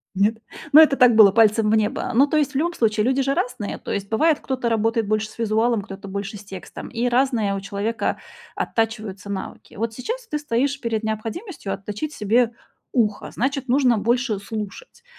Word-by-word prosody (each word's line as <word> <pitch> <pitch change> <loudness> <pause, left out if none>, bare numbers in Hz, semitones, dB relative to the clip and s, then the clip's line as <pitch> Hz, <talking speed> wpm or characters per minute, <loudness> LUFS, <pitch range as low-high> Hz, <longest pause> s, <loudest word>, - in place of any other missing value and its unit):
Нет? 210 +4 +2 0.4
Ну, 310 - +10
это 300 -3 +7
так 250 -3 +5
было, 210 -3 +8
пальцем 220 0 +4
в - - +4
небо. 215 +3 0
Ну, 270 +5 +5
то 310 - +1
есть 290 -2 +1
в 275 - -17
любом 340 +5 0
случае 215 -2 +1
люди 265 +1 +2
же 275 +1 +1
разные, 220 -6 -3
то - - -7
есть 200 0 -3
бывает, 305 +7 +2
кто-то 255 -3 -2
работает 225 -1 +1
больше 215 0 0
с - - -17
визуалом, 225 0 +1
кто-то 195 +1 -9
больше 200 +1 -5
с 200 - -12
текстом, 190 -3 -9
и 240 +1 -1
разные 240 -6 +1
у - - -3
человека 205 +4 -2 0.4
оттачиваются 215 -4 -2
навыки. 190 - -7
Вот 225 +1 -3
сейчас 460 - -5
ты 300 - -2
стоишь 280 0 -1
перед 225 -3 -2
необходимостью 220 - -4
отточить 210 +9 -5
себе 230 +2 +2 0.4
ухо, 215 -5 0
значит 270 +2 -2
нужно 250 -2 +3
больше 235 0 0
слушать. 215 - -7
225 Hz, 190 wpm, -22 LUFS, 210-265 Hz, 0.4 s, Ну